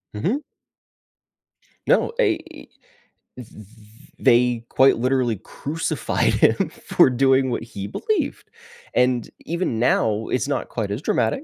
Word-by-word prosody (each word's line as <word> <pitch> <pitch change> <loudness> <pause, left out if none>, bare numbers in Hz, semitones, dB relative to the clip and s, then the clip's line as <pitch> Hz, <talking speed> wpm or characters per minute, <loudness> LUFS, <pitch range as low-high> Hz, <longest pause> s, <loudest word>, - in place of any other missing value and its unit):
Mhm. 195 - -1 1.5
No, - - +3
a - - +3
th - - -14 0.7
th 125 -3 -9
th 105 -2 -14 0.5
they, 120 -1 +3
quite 135 +1 +4
literally 125 -2 +1
crucified 150 - -2
him - - +2
for - - +2
doing 130 +1 +2
what 120 - -3
he 100 -4 -7
believed, 425 - -3 0.4
and, 125 -2 +1 0.2
even 170 -9 -2
now 110 -2 +1
it's 130 - -1
not 140 - -2
quite 105 -4 -3
as 105 +6 -3
dramatic, 275 - 0
125 Hz, 125 wpm, -22 LUFS, 115-135 Hz, 1.5 s, quite